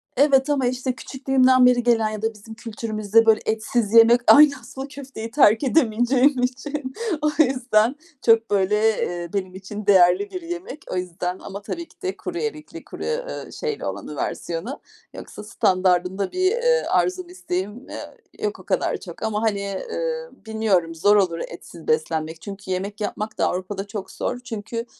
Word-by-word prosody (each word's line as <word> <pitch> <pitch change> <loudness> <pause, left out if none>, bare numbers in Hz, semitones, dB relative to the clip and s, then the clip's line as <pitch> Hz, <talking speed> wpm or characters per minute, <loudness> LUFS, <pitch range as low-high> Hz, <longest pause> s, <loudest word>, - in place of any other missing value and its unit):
Evet 275 0 +4
ama 275 -3 +1
işte 255 0 -2
küçüklüğümden 260 -1 +3
beri 245 -1 +4
gelen 225 -3 +3
ya 215 -1 -6
da 225 0 -1
bizim 215 +1 -12
kültürümüzde 220 -1 0
böyle 220 -1 +5
etsiz 220 0 -1
yemek, 230 +1 +7
aynı 295 -1 +8
aslında 265 +3 -8
köfteyi 270 -5 -8
terk 225 -5 +5
edemeyeceğim 255 0 +3
için. 265 +1 -3 0.3
O 300 - +2
yüzden 250 -2 +2 0.3
çok 225 -1 +4
böyle, 200 0 +2 0.2
eee, 175 -1 -3
benim 185 -2 -3
için 205 +2 -7
değerli 190 0 +4
bir 365 - -5
yemek. 345 +1 -7
O - - -2
yüzden 180 0 -3
ama 200 +1 -8
tabii 335 +10 -6
ki - - -26
de 380 0 -3
kuru - - -5
erikli, 315 -9 -5
kuru, - - -8
eee, - - -4
şeyli 450 -2 -3
olanı - - -5
versiyonu - - -4 0.3
yoksa - - -9
standardında 185 -2 +1
bir, 370 +1 +2
eee, 485 +1 +2
arzum, 365 -1 0
isteğim, 210 - -5
eee, - - -8 0.3
yok 420 - -2
o - - -12
kadar - - 0
çok - - -10
ama 215 -1 -1
hani, 215 -3 +1
eee, 485 - -4 0.2
bilmiyorum 200 -7 0
zor 205 +6 +4
olur 180 -5 +2
etsiz 170 -1 -12
beslenmek. 160 +1 -1
Çünkü 200 -2 -8
yemek 200 +3 -3
yapmak 210 +1 -4
da - - +2
Avrupa'da 195 +2 -4
çok 200 -1 -6
zor 245 - -3
çünkü 230 -1 -5
225 Hz, 165 wpm, -23 LUFS, 200-275 Hz, 0.3 s, aynı